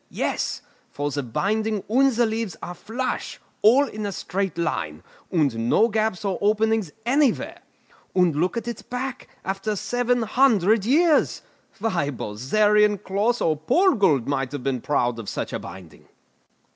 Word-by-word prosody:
Yes; - - -2 0.3
for 145 +1 -3
the 145 - -2
binding 210 - -1
and 265 +6 +4
the 240 0 +2
leaves 220 -6 -3
are 175 - -5
flush, 240 +7 -4 0.2
all 250 +7 +6
in 215 -3 -6
a - - -3
straight 190 0 -3
line, 85 - -2 0.3
and 135 - +1
no 230 - +4
gaps 215 -3 -1
or 195 -2 -1
openings 215 -3 +1
anywhere. 270 0 +1 0.5
And 180 -4 +3
look 180 +9 0
at 230 0 -4
its 235 - -5
back, 255 +1 -5 0.2
after 195 +2 -2
seven 245 +3 0
hundred 220 -4 +3
years. 310 +5 +3 0.3
Why, 185 -9 -1
Bozerian, 205 - +2
Closs, 210 +6 0
or 160 - +2
Purgold 185 - +3
might 135 -2 -1
have 145 -3 -5
been 130 -2 -1
proud 120 -4 0
of 110 - -6
such - - -4
a - - -2
binding!" 90 -4 -12
205 Hz, 150 wpm, -24 LUFS, 150-230 Hz, 0.5 s, all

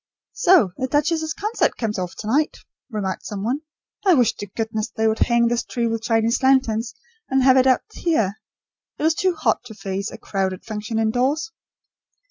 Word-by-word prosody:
"So 345 - +4
the 260 - -1
duchess's 315 +3 0
concert 425 +3 0
comes 215 -4 -2
off 180 -1 -4
to 210 - -7
night," 290 +7 +1 0.3
remarked 200 -5 -3
some 200 -2 -5
one. 255 +7 -1 0.4
"I 375 -4 +5
wish 240 -5 +3
to 205 - -6
goodness 220 +2 -3
they 220 -1 0
would 220 0 0
hang 235 -1 +3
this 240 0 0
tree 240 -1 -2
with 225 -1 -1
Chinese 225 +1 +1
lanterns 260 -4 +2 0.3
and, 265 0 +2
have 260 0 +6
it 260 0 +5
out 255 - +3
here. 220 - 0 0.6
It - - -5
is 320 - +4
too 370 +2 0
hot 315 - 0
to 220 -3 -10
face 195 0 -4
a - - -9
crowded 190 -2 -3
function 215 0 -4
indoors." 255 - 0
235 Hz, 185 wpm, -22 LUFS, 215-270 Hz, 0.6 s, have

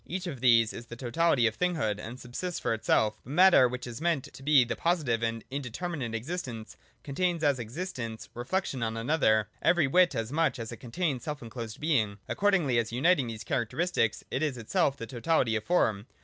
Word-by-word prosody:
Each 185 +2 -4
of 150 -8 -5
these 115 -3 +5
is 115 - -9
the 120 - -8
totality 130 +1 +2
of 110 -1 +1
thinghood 160 - 0
and 120 +4 -8
subsists 160 +9 -5
for - - 0
itself 110 -1 +1
But 130 - -8
Matter, 180 -6 +7
which 125 +1 -5
is 120 +3 -7
meant 165 -5 +1
to - - -12
be 140 -2 +5
the - - -3
positive 150 -10 0
and 115 -1 -2
indeterminate 140 -1 -4
existence, 120 -4 -5 0.3
contains, 170 +3 -1
as 140 -3 +2
an - - -2
existence, 120 - -6
reflection 135 +2 -2
on 115 0 -2
another, 115 -4 +2
every 175 -4 +4
whit 175 +3 +4
as 115 0 -3
much 160 0 +1
as 115 -1 -6
it 120 - -7
contains 140 +1 -2
selfenclosed 120 -7 -6
being. 115 -10 +1
Accordingly 180 -12 +2
as 115 -1 -2
uniting 140 +2 +2
these 110 -2 -6
characteristics, 115 -3 0
it 130 - -1
is 150 -5 -1
itself 140 - 0
the 115 - -6
totality 125 -1 +1
of 110 - -3
Form. 110 - +1
130 Hz, 190 wpm, -29 LUFS, 115-165 Hz, 0.3 s, Matter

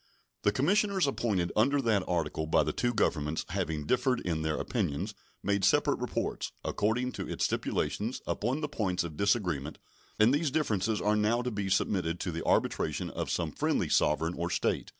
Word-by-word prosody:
The 105 - +3
commissioners 190 - +2
appointed 105 -10 0
under 140 +7 +3
that 110 -7 +2
article 80 -2 -1
by - - +4
the - - -2
two 120 - 0
Governments 80 -8 0
having 75 -2 -2
differed 125 - +2
in 80 -3 -1
their 80 -1 -1
opinions, 90 - -2 0.3
made 100 0 +1
separate 95 - +3
reports, - - -2
according 120 +5 0
to - - -6
its - - 0
stipulations, 115 +5 -1
upon 125 +8 -1
the 150 - -1
points 95 -12 -1
of 80 -3 -6
disagreement, 85 - 0 0.4
and 110 +4 +5
these 150 +1 +2
differences 110 -8 0
are 105 +1 +2
now 110 +3 +2
to 125 - -2
be 100 -2 -2
submitted 90 -3 0
to 90 - -2
the 85 0 -4
arbitration - - 0
of - - -4
some - - -1
friendly - - 0
sovereign 80 +3 +2
or 85 +1 -2
state. 90 - 0
105 Hz, 175 wpm, -30 LUFS, 85-120 Hz, 0.4 s, and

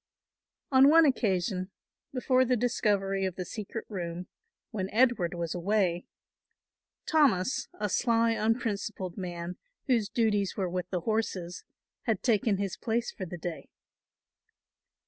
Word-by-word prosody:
On 270 +1 +7
one 325 +1 +7
occasion, 190 - 0 0.4
before 255 0 +2
the 255 0 +2
discovery 200 -5 +1
of 190 -2 -1
the 185 - -4
secret 215 +3 -6
room, 175 -3 -5 0.5
when 195 -4 -3
Edward 225 -8 +2
was 170 -2 -3
away, 180 -1 0 1.0
Thomas, 270 - +2
a 210 - 0
sly 230 +2 +2
unprincipled 215 -5 -1
man, 175 -2 -5 0.3
whose 230 -6 +2
duties 205 -4 +1
were 190 -2 0
with 180 0 -3
the 180 -2 -2
horses, 185 -4 -2 0.4
had 220 -4 0
taken 220 -3 +2
his 195 -2 -3
place 230 +1 -1
for 185 - -6
the 175 - -6
day. 170 -1 -6
200 Hz, 125 wpm, -29 LUFS, 180-230 Hz, 1.0 s, On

